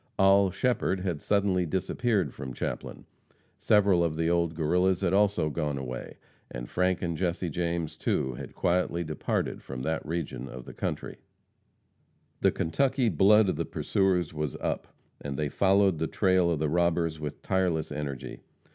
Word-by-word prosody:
Oll. 95 0 +5
Shepherd 95 -2 0
had 90 -5 -2
suddenly 100 -3 +2
disappeared 95 +4 0
from 65 -2 -7
Chaplin; - - -5 0.5
several 100 -5 +4
of 80 -2 0
the 80 +1 +1
old 85 -1 +1
Guerrillas 90 +4 +2
had 95 -2 +1
also 100 -6 +2
gone 75 -2 -2
away, 65 -2 -6 0.3
and - - -6
Frank 90 0 0
and 85 -2 -1
Jesse 85 0 -1
James, 85 -1 -2
too, 65 - -1
had - - -9
quietly 85 -1 +1
departed 80 -3 -2
from 65 -1 -7
that 80 +2 -1
region 80 -5 -4
of 65 -1 -9
country. - - -4 1.2
The - - +4
Kentucky 130 - +1
blood 105 +4 +5
of 90 - 0
the 85 - 0
pursuers 90 -5 0
was 75 -3 -3
up, - - -3 0.3
and 70 -2 -5
they 75 0 -1
followed 95 -1 +3
the 80 - 0
trail 95 -2 +2
of 85 - +1
the 80 +1 0
robbers 85 0 +1
with 75 -2 -6
tireless 90 -5 0
energy. 75 -3 -5
85 Hz, 155 wpm, -28 LUFS, 75-95 Hz, 1.2 s, Oll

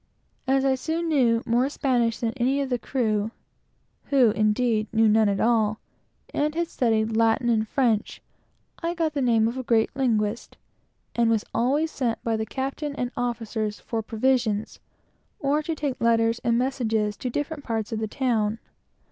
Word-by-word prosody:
As 270 0 +2
I 270 - +4
soon 325 +5 -2
knew 240 -6 +3
more 240 +3 +2
Spanish 245 -6 0
than 230 -1 -2
any 265 +2 +1
of 275 -2 -2
the 245 - +1
crew, 220 -5 -1 0.8
(who 260 -6 +4
indeed 215 +1 +1
knew 225 0 +4
none 215 0 +4
at 200 - -1
all,) 220 -2 +2 0.5
and - - -1
had 300 +1 +1
been 335 - 0
at 340 - -3
college 235 -3 +3 0.5
and - - -6
knew 235 -2 +3
Latin, 235 -6 +2 0.8
I 340 +1 -2
got 325 -3 0
the 285 - -1
name 230 -3 +3
of 240 +3 -3
a - - -4
great 230 -2 +1
linguist, 225 -4 -1 0.6
and 235 -1 +2
was 225 -2 +1
always 290 +7 +1
sent 240 -4 -1
for - - -42
by - - +2
the 220 0 -3
captain 275 +5 -4
and 250 -2 -3
officers 225 -3 -2
to - - -22
get 225 -2 -2
provisions, 225 -3 0 0.6
or 285 +2 +1
to 320 +1 -3
carry 290 -3 -2
letters 230 0 +2
and 235 0 +1
messages 225 -5 0
to 255 - -3
different 290 +3 -4
parts 225 -3 -3
of 220 - -2
the 220 - -2
town. 220 -3 0
235 Hz, 180 wpm, -25 LUFS, 220-270 Hz, 0.8 s, I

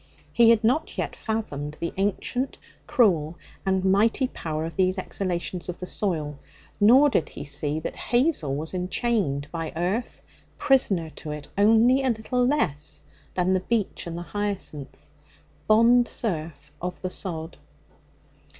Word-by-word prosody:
He 235 -1 +6
had 230 -1 +4
not 260 +8 +1
yet - - -2
fathomed 150 -10 -4
the 170 - -3
ancient, 205 +7 -1 0.3
cruel 170 -9 +2 0.3
and 190 0 +1
mighty 220 +7 +3
power 155 -6 -4
of 165 - -6
these 185 0 +2
exhalations 180 -2 -3
of 175 - -4
the 180 - -6
soil. 155 -8 -2 0.4
Nor 255 +8 +7
did 160 - +1
he - - -8
see 145 +1 0
that - - -5
Hazel 240 - +2
was 155 +4 -5
enchained 180 - 0
by 165 -2 -4
earth, 185 +8 -2 0.3
prisoner 195 - +2
to 155 - -9
it 150 -1 -6
only 225 +6 +5
a 265 - +1
little 245 +2 0
less 155 - 0 0.3
than 185 +1 +2
the 185 - +3
beech 205 -1 -2
and 170 0 -5
the 175 - -5
hyacinth 195 -8 -4 0.7
bond 235 +3 +5
serf 155 -8 -4
of 180 +1 -4
the 185 - -2
sod. 165 -4 -4
185 Hz, 145 wpm, -25 LUFS, 160-225 Hz, 0.7 s, Nor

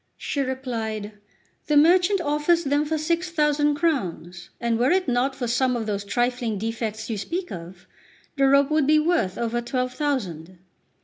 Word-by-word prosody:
She 285 - -2
replied: 230 -5 -3 0.6
"The 300 - +3
merchant 355 +5 +4
offers 300 +3 +1
them 290 +1 +1
for 315 +1 -1
six 335 +3 -1
thousand 295 -2 +2
crowns; 185 - -2
and 235 -1 0
were 250 +2 +3
it 370 0 +2
not 255 +2 +1
for 255 - -3
some 250 +2 +1
of 230 -2 -3
those 205 -2 -2
trifling 240 +1 -1
defects 220 0 -4
you 220 -3 -3
speak 355 - -4
of, 175 +1 -9 0.5
the 275 -1 +3
rope 280 +1 +4
would 305 -3 +2
be 310 +1 +5
worth 305 - +1
over 235 0 -1
twelve 250 +1 -2
thousand." 185 - -3
260 Hz, 170 wpm, -24 LUFS, 220-300 Hz, 0.6 s, be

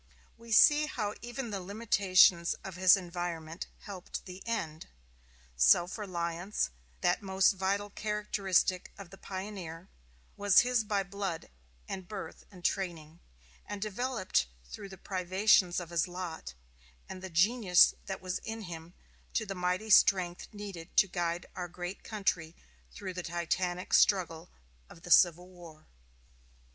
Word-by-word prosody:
We 230 0 -13
see 295 +7 +6
how 210 -8 -3
even 240 0 -5
the 200 - -3
limitations 190 -3 +3
of 190 -2 -7
his 185 +1 +6
environment 170 -2 -5
helped 190 -3 -7
the 185 +1 -10
end. 165 -9 -3 0.7
Self 65 - +4
reliance, 175 - -2 0.3
that - - +2
most 190 -1 +3
vital 200 +1 -2
characteristic 200 -4 0
of 195 -3 -11
the 195 - -13
pioneer, 185 -3 -7 0.5
was 205 -2 +5
his 245 -2 +1
by 205 -2 0
blood 195 - -5 0.4
and 190 -2 -6
birth 205 -1 -8
and 185 -3 -14
training; 170 -4 -2 0.5
and 205 -1 -5
developed 215 - -1 0.2
through 195 - -9
the 190 - -11
privations 185 0 +2
of 175 -1 -8
his 170 0 +1
lot 175 - -7 0.5
and 185 - -8
the 190 - -6
genius 185 +2 +5
that 190 - -5
was 185 0 -2
in 225 0 -6
him 170 -1 -9 0.4
to 220 - +1
the 195 - -4
mighty 180 +4 -2
strength 180 -4 +4
needed 195 -5 -9
to 195 - +6
guide 175 -1 -2
our 180 -1 -4
great 175 +2 -7
country 185 -6 -2 0.4
through 125 - -7
the 180 - -4
titanic 175 +1 -2
struggle 175 -4 +3 0.4
of 165 - -15
the 175 - -7
Civil 175 +1 +5
War. 170 -4 -14
185 Hz, 140 wpm, -31 LUFS, 175-205 Hz, 0.7 s, see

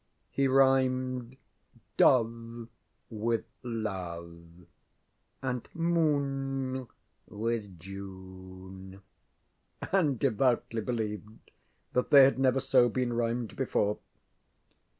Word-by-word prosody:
He 140 0 +2
rhymed 130 -2 +2 0.6
ŌĆ£doveŌĆØ 115 -1 +2 0.4
with 115 +1 -1 0.2
ŌĆ£loveŌĆØ 85 -6 -6 0.8
and 125 -2 -2
ŌĆ£moonŌĆØ 135 -6 -1 0.4
with 105 -4 -3
ŌĆ£June, 95 0 -10 0.8
ŌĆØ 195 - +2
and 145 -7 +1
devoutly 120 -2 +1
believed 110 -2 -5 0.4
that 125 - +1
they 140 -2 +9
had 130 0 +4
never 135 0 +3
so 120 -1 +4
been 125 0 -1
rhymed 120 -1 -1
before. 105 -5 0
115 Hz, 85 wpm, -30 LUFS, 100-130 Hz, 0.8 s, they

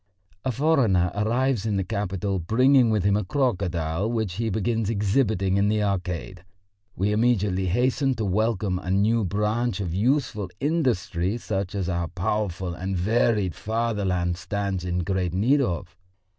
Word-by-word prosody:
A 130 - 0
foreigner 115 - +2
arrives 120 +2 0
in 105 -2 0
the 95 - 0
capital 100 -1 -2
bringing 125 +7 +4
with 105 -4 +1
him 100 0 +3
a 105 - 0
crocodile 95 - -1
which 110 -6 -2
he 115 0 -1
begins 110 +1 -1
exhibiting 100 -2 +1
in 100 +1 +3
the 105 0 +1
Arcade. 90 -3 -3 0.5
We 100 +3 0
immediately 105 -4 +1
hasten 130 - +1
to 110 -2 -2
welcome 100 -1 0
a 90 - -7
new 105 +4 +2
branch 105 +3 -1
of 90 -5 -3
useful 110 -2 0
industry 120 - 0
such 100 -4 -3
as 95 -3 -2
our 85 -2 -1
powerful 95 0 -2
and 95 +2 -3
varied 105 -1 +1
fatherland 100 -6 -1
stands 100 -2 -3
in 90 0 -1
great 90 -1 -1
need 130 +9 +3
of. 85 - -3
100 Hz, 150 wpm, -25 LUFS, 90-115 Hz, 0.5 s, bringing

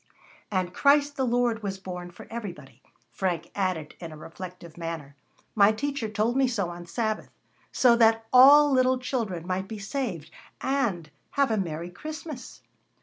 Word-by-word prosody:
"And 185 -3 -1
Christ 285 +4 +3
the 265 -2 0
Lord 240 -2 +1
was 195 -2 -3
born 180 -2 -7
for 175 - -12
everybody," 175 - -8 0.3
Frank 170 +5 -2
added 185 -6 -2
in 170 -2 -7
a 155 - -10
reflective 170 +1 -10
manner. 165 -4 -6 0.4
"My 205 -1 +6
teacher 275 0 -3
told 220 +3 0
me 270 -1 +3
so 200 -8 -1
on 175 0 -9
Sabbath, 215 +4 -2 0.4
so 245 -2 +5
that 225 -1 +4
all 285 +3 +8
little 255 -1 +3
children 225 -10 -3
might 185 +1 -2
be 220 - -6
saved, 195 - -4 0.3
and, 230 - -1 0.2
have 280 -3 +2
a 220 - +1
merry 170 -2 -3
Christmas." 305 - -8
210 Hz, 155 wpm, -27 LUFS, 175-255 Hz, 0.4 s, all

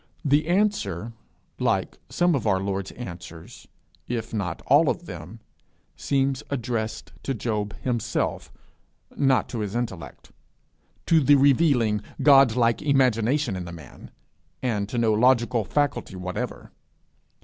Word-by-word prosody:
The 145 +2 +3
answer, 145 - 0 0.5
like - - 0
some 175 0 +2
of 125 -7 -1
our 95 -2 +2
Lord's 95 0 -3
answers 90 -7 -10 0.4
if 115 -2 -4
not 95 -6 -3
all - - +5
of - - -3
them, - - -9 0.5
seems 135 -1 0
addressed 115 -4 -3
to 135 - -3
Job 105 -2 -3
himself, 120 -3 -2 0.6
not 135 -2 +2
to 120 - -4
his 105 0 -4
intellect; 95 - -5 0.7
to 165 - +4
the 145 0 +5
revealing, 135 -6 +3 0.2
God 135 -4 +6
like 115 -2 +2
imagination 130 -3 +2
in 90 -1 -5
the 85 - -8
man, 80 -7 -12 0.5
and 105 -5 -1
to 120 - -4
no 115 -2 +3
logical 120 0 +3
faculty 145 -4 -1
whatever. 90 0 -5
120 Hz, 125 wpm, -25 LUFS, 105-135 Hz, 0.7 s, God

